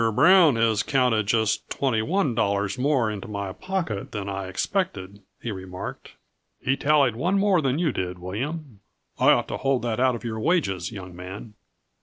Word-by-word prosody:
Brown 175 Hz, -, +6 dB
has 115 Hz, -2 st, +2 dB
counted 125 Hz, -7 st, +1 dB
just 110 Hz, 0 st, +1 dB
twenty 130 Hz, -6 st, 0 dB
one 160 Hz, -, 0 dB
dollars 100 Hz, -3 st, 0 dB
more 130 Hz, -4 st, +1 dB
into 105 Hz, +3 st, -6 dB
my 100 Hz, -3 st, -4 dB
pocket 180 Hz, -, -3 dB
than 100 Hz, -2 st, -4 dB
I 95 Hz, -1 st, -4 dB
expected," 100 Hz, -, -2 dB, 0.2 s
he 115 Hz, -, -4 dB
remarked. 95 Hz, -2 st, -7 dB, 0.5 s
"He 135 Hz, -, +1 dB
tallied 140 Hz, -5 st, +3 dB
one 180 Hz, +11 st, +1 dB
more 195 Hz, -3 st, +3 dB
than 135 Hz, -1 st, 0 dB
you 165 Hz, -3 st, +1 dB
did, 90 Hz, -4 st, -3 dB
William. 120 Hz, -, -5 dB, 0.4 s
I -, -, +3 dB
ought -, -, +4 dB
to -, -, -3 dB
hold 135 Hz, -2 st, 0 dB
that 115 Hz, -1 st, -1 dB
out 130 Hz, -1 st, +3 dB
of 120 Hz, -, -8 dB
your 110 Hz, -2 st, -4 dB
wages, 100 Hz, -, 0 dB
young 95 Hz, -5 st, -9 dB
man." 95 Hz, +5 st, -8 dB
115 Hz, 175 wpm, -25 LUFS, 100-140 Hz, 0.5 s, Brown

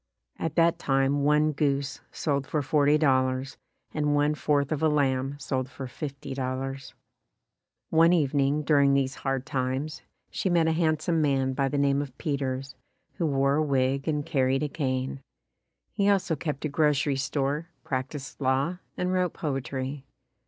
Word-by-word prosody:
At 165 Hz, -1 st, -2 dB
that 170 Hz, 0 st, +3 dB
time 135 Hz, +1 st, +1 dB
one 150 Hz, +1 st, +3 dB
goose 140 Hz, -1 st, -1 dB
sold 140 Hz, -3 st, -1 dB
for 150 Hz, 0 st, -1 dB
forty 145 Hz, +1 st, +3 dB
dollars 130 Hz, -2 st, +1 dB, 0.4 s
and 150 Hz, -1 st, +1 dB
one 145 Hz, +1 st, +3 dB
fourth 145 Hz, -1 st, 0 dB
of 155 Hz, -1 st, -1 dB
a 160 Hz, -, +4 dB
lamb 135 Hz, -2 st, +1 dB
sold 130 Hz, -2 st, -2 dB
for 135 Hz, 0 st, -7 dB
fifty 140 Hz, +1 st, -6 dB
dollars. 130 Hz, 0 st, -4 dB, 1.0 s
One 165 Hz, +1 st, +6 dB
evening 145 Hz, -2 st, +2 dB
during 140 Hz, -2 st, +4 dB
these 135 Hz, -1 st, 0 dB
hard 135 Hz, -1 st, -1 dB
times 135 Hz, +4 st, -2 dB, 0.3 s
she 190 Hz, -, -1 dB
met 170 Hz, -2 st, +3 dB
a 160 Hz, -, +2 dB
handsome 160 Hz, 0 st, +1 dB
man 135 Hz, -3 st, +1 dB
by 135 Hz, 0 st, 0 dB
the 145 Hz, -, -2 dB
name 140 Hz, 0 st, +2 dB
of 135 Hz, -3 st, -8 dB
Peters, 135 Hz, -3 st, -2 dB, 0.4 s
who 170 Hz, -4 st, +1 dB
wore 140 Hz, 0 st, +2 dB
a 155 Hz, -, +2 dB
wig 135 Hz, -1 st, 0 dB
and 150 Hz, -2 st, 0 dB
carried 135 Hz, -1 st, +1 dB
a 150 Hz, -, -1 dB
cane. 130 Hz, -2 st, -2 dB, 0.7 s
He 200 Hz, -1 st, +1 dB
also 190 Hz, -4 st, +2 dB
kept 150 Hz, -1 st, -4 dB
a -, -, +2 dB
grocery 145 Hz, -1 st, +2 dB
store, 140 Hz, +3 st, -1 dB, 0.2 s
practiced 135 Hz, +2 st, -5 dB
law 135 Hz, +7 st, +1 dB, 0.2 s
and 180 Hz, 0 st, 0 dB
wrote 180 Hz, -1 st, +1 dB
poetry. 135 Hz, -1 st, -3 dB
140 Hz, 160 wpm, -27 LUFS, 135-150 Hz, 1.0 s, One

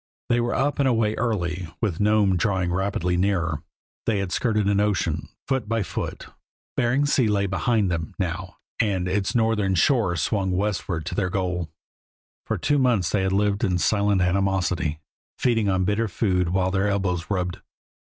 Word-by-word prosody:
They 120 Hz, 0 st, +3 dB
were 120 Hz, 0 st, -1 dB
up 145 Hz, +1 st, 0 dB
and 140 Hz, -, +3 dB
away 115 Hz, -4 st, +2 dB
early, 95 Hz, -8 st, -2 dB
with 100 Hz, -8 st, -1 dB
Nome 105 Hz, -2 st, +3 dB
drawing 90 Hz, -2 st, 0 dB
rapidly 90 Hz, -2 st, 0 dB
nearer. 85 Hz, -5 st, 0 dB, 0.5 s
They 110 Hz, -3 st, +2 dB
had 100 Hz, -2 st, -2 dB
skirted 105 Hz, -1 st, +1 dB
an 100 Hz, 0 st, +2 dB
ocean, 95 Hz, -7 st, 0 dB, 0.2 s
foot 130 Hz, -6 st, -1 dB
by 115 Hz, -2 st, +1 dB
foot; -, -, -5 dB, 0.5 s
Bering 125 Hz, +4 st, +2 dB
Sea 135 Hz, -5 st, +2 dB
lay 100 Hz, -1 st, +1 dB
behind 100 Hz, +1 st, +1 dB
them, 80 Hz, -2 st, -3 dB
now, 90 Hz, 0 st, -4 dB, 0.2 s
and 95 Hz, -5 st, +1 dB
its 95 Hz, +4 st, -1 dB
northern 110 Hz, -4 st, +2 dB
shore 100 Hz, -, +3 dB
swung 95 Hz, +1 st, 0 dB
westward 90 Hz, -4 st, -1 dB
to -, -, -4 dB
their 95 Hz, -3 st, 0 dB
goal. 90 Hz, -3 st, -2 dB, 0.8 s
For -, -, -1 dB
two 145 Hz, 0 st, +1 dB
months 120 Hz, -9 st, +2 dB
they 100 Hz, -, +1 dB
had 95 Hz, 0 st, 0 dB
lived 100 Hz, +1 st, +1 dB
in 90 Hz, -2 st, +2 dB
silent 100 Hz, +2 st, +2 dB
animosity, 90 Hz, -4 st, +1 dB, 0.4 s
feeding 115 Hz, -4 st, +1 dB
on 95 Hz, -1 st, +1 dB
bitter 105 Hz, +4 st, +1 dB
food 90 Hz, -3 st, 0 dB
while 95 Hz, +1 st, +1 dB
their 95 Hz, +2 st, +1 dB
elbows 95 Hz, -4 st, -1 dB
rubbed. 90 Hz, -3 st, -2 dB
100 Hz, 170 wpm, -24 LUFS, 90-110 Hz, 0.8 s, They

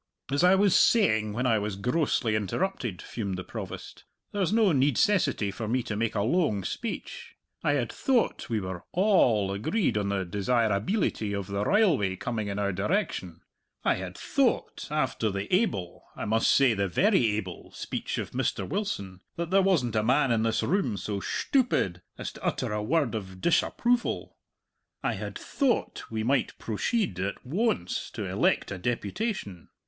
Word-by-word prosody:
"As 140 Hz, +4 st, +2 dB
I 180 Hz, +1 st, +7 dB
was 195 Hz, -1 st, +4 dB
saying 110 Hz, -, +4 dB
when 125 Hz, +4 st, -1 dB
I 115 Hz, -3 st, +3 dB
was 105 Hz, -1 st, -3 dB
grossly 125 Hz, +1 st, 0 dB
interrupted," 110 Hz, -, -2 dB
fumed 100 Hz, -5 st, -4 dB
the 90 Hz, -, -5 dB
Provost, -, -, -8 dB, 0.3 s
"there's 200 Hz, -3 st, 0 dB
no 215 Hz, -3 st, +4 dB
needcessity 140 Hz, -, +2 dB
for 110 Hz, +2 st, -5 dB
me 125 Hz, +3 st, 0 dB
to 105 Hz, -, -4 dB
make 110 Hz, +1 st, -1 dB
a 100 Hz, -, +1 dB
loang 115 Hz, -, +1 dB
speech. -, -, -5 dB, 0.3 s
I 145 Hz, -, +3 dB
had 125 Hz, -5 st, 0 dB
thoat 255 Hz, -, 0 dB
we 115 Hz, -2 st, 0 dB
were 95 Hz, -2 st, -4 dB
a -, -, -18 dB
all 125 Hz, -, +3 dB
agreed 110 Hz, -, 0 dB
on 100 Hz, -1 st, -1 dB
the 100 Hz, -2 st, -1 dB
desirabeelity 105 Hz, -, 0 dB
of 100 Hz, -, -4 dB
the 100 Hz, +1 st, -2 dB
rileway 160 Hz, -, +3 dB
coming 110 Hz, -4 st, -2 dB
in 100 Hz, 0 st, -3 dB
our 100 Hz, -1 st, 0 dB
direction. 95 Hz, -, -2 dB, 0.4 s
I -, -, +4 dB
had -, -, -6 dB
thoat, -, -, 0 dB
after 110 Hz, -, 0 dB
the 100 Hz, -, -4 dB
able 100 Hz, -, 0 dB
I -, -, -4 dB
must 110 Hz, +2 st, +2 dB
say 135 Hz, -4 st, +5 dB
the 100 Hz, -2 st, 0 dB
very 120 Hz, -, +3 dB
able 95 Hz, -5 st, -6 dB
speech -, -, -4 dB
of -, -, -4 dB
Mr. -, -, -1 dB
Wilson, 100 Hz, -, -3 dB
that 170 Hz, 0 st, -4 dB
there 195 Hz, +1 st, +5 dB
wasn't 155 Hz, -, +2 dB
a 110 Hz, -, +3 dB
man 130 Hz, +4 st, +3 dB
in 115 Hz, -1 st, +2 dB
this 110 Hz, -1 st, +1 dB
room 145 Hz, -, +1 dB
so 100 Hz, +1 st, -3 dB
shtupid 100 Hz, -, 0 dB, 0.2 s
as -, -, -5 dB
to -, -, -13 dB
utter -, -, -1 dB
a 105 Hz, -, -1 dB
word 140 Hz, +2 st, +1 dB
of 95 Hz, -4 st, -6 dB
dishapproval. 235 Hz, -, +1 dB, 0.7 s
I -, -, +1 dB
had -, -, -5 dB
thoat 270 Hz, -4 st, -1 dB
we 110 Hz, -1 st, -2 dB
might 135 Hz, +4 st, +1 dB
prosheed 115 Hz, -, -1 dB
at 100 Hz, +5 st, -3 dB
woance 170 Hz, -, -1 dB
to -, -, -4 dB
elect -, -, +1 dB
a 95 Hz, -, -4 dB
deputation. 115 Hz, -, -3 dB
115 Hz, 170 wpm, -28 LUFS, -, 0.7 s, I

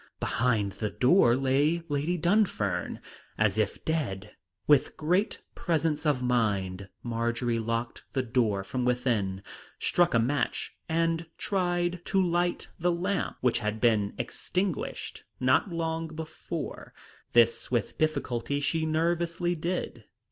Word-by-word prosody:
Behind 115 Hz, -5 st, +1 dB
the 105 Hz, +1 st, -3 dB
door 120 Hz, -, +4 dB
lay 140 Hz, +6 st, +2 dB
Lady 150 Hz, +4 st, 0 dB
Dunfern, 170 Hz, -, +1 dB, 0.4 s
as -, -, +2 dB
if -, -, -1 dB
dead. 105 Hz, -11 st, -2 dB, 0.3 s
With 145 Hz, -2 st, +3 dB
great 180 Hz, +7 st, 0 dB
presence 160 Hz, -2 st, 0 dB
of 130 Hz, -4 st, +2 dB
mind 100 Hz, -6 st, 0 dB
Marjory 120 Hz, 0 st, -1 dB
locked 115 Hz, +1 st, -3 dB
the 130 Hz, -, +1 dB
door 115 Hz, -5 st, +1 dB
from 125 Hz, +6 st, -3 dB
within, 115 Hz, -6 st, 0 dB, 0.3 s
struck 175 Hz, -7 st, +2 dB
a -, -, +5 dB
match, 135 Hz, +5 st, -1 dB
and 165 Hz, 0 st, +1 dB
tried 175 Hz, -2 st, 0 dB
to 195 Hz, -, +1 dB
light 175 Hz, -1 st, +1 dB
the 175 Hz, +1 st, +2 dB
lamp, 185 Hz, +4 st, -1 dB
which 125 Hz, -1 st, +2 dB
had 110 Hz, -1 st, -2 dB
been 110 Hz, -4 st, +2 dB
extinguished 185 Hz, -2 st, -3 dB, 0.2 s
not 130 Hz, +10 st, +3 dB
long 165 Hz, -1 st, -2 dB
before; 160 Hz, 0 st, -6 dB, 0.4 s
this 115 Hz, -1 st, +4 dB
with 120 Hz, -4 st, -1 dB
difficulty 140 Hz, -3 st, 0 dB
she 160 Hz, +2 st, 0 dB
nervously 170 Hz, +2 st, +1 dB
did. 175 Hz, +2 st, -3 dB
140 Hz, 125 wpm, -28 LUFS, 115-170 Hz, 0.4 s, a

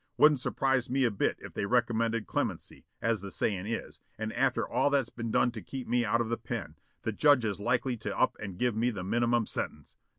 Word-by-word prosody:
Wouldn't 150 Hz, -2 st, +6 dB
surprise 135 Hz, -1 st, 0 dB
me 135 Hz, +1 st, +2 dB
a 120 Hz, -, +3 dB
bit 100 Hz, -, 0 dB
if -, -, -9 dB
they 100 Hz, -, -2 dB
recommended 115 Hz, -1 st, +1 dB
clemency, -, -, -3 dB, 0.2 s
as 115 Hz, -3 st, +1 dB
the 100 Hz, -, -6 dB
sayin' 100 Hz, -1 st, -1 dB
is, 115 Hz, -, -4 dB, 0.2 s
and 110 Hz, 0 st, -3 dB
after -, -, +1 dB
all -, -, +2 dB
that's 135 Hz, -5 st, +1 dB
been 115 Hz, -1 st, -4 dB
done 120 Hz, +2 st, +3 dB
to 115 Hz, -2 st, -7 dB
keep 130 Hz, -2 st, -7 dB
me 120 Hz, +1 st, +2 dB
out 115 Hz, +1 st, +2 dB
of 115 Hz, -, -2 dB
the 115 Hz, -, 0 dB
pen, -, -, -5 dB, 0.3 s
the 110 Hz, -, 0 dB
judge 140 Hz, +1 st, +4 dB
is 105 Hz, -2 st, -2 dB
likely 120 Hz, +3 st, 0 dB
to -, -, -4 dB
up -, -, +3 dB
and 95 Hz, -4 st, -6 dB
give 125 Hz, -1 st, +1 dB
me 115 Hz, +3 st, +2 dB
the 100 Hz, -6 st, -4 dB
minimum 120 Hz, +3 st, +2 dB
sentence. -, -, -5 dB
115 Hz, 225 wpm, -30 LUFS, 110-125 Hz, 0.3 s, Wouldn't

